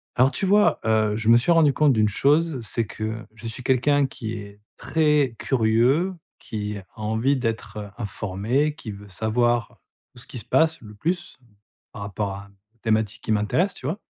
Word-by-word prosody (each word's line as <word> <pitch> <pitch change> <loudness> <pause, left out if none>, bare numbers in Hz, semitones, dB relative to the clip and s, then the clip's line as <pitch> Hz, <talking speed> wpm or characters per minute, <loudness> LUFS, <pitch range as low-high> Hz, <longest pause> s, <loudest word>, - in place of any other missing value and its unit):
Alors 130 +3 +4
tu 195 - 0
vois, 205 +2 +4
heu, 110 -1 +2
je 110 0 0
me 115 - +8
suis 125 +9 +2
rendu 160 -3 +5
compte 145 -1 +4
d'une 110 -2 +3
chose, 145 +5 +2
c'est 115 +2 -1
que 110 +1 -5
je 115 +1 -9
suis 115 +3 -5
quelqu'un 140 +3 +3
qui 120 -4 -5
est 100 -2 -9 0.2
très 150 -6 +2
curieux, 130 +9 +2 0.2
qui 105 -1 -5
a 95 - -10 0.2
envie 110 +6 +1
d'être 110 -4 -4
informé, 115 +7 -1
qui 130 -9 -7
veut 100 0 -11
savoir 115 +4 0 0.3
tout 125 - -12
ce - - -10
qui - - -7
se 115 - -4
passe 160 0 +2
le 105 -2 -11
plus, 175 - -3 0.5
par 105 - -7
rapport 100 0 -3
à 100 +1 -7
un 100 - -20 0.3
thématique 110 -1 0
qui 110 - 0
m'intéresse, 105 - +1
tu - - -10
vois? 165 +9 -2
115 Hz, 185 wpm, -24 LUFS, 105-145 Hz, 0.5 s, me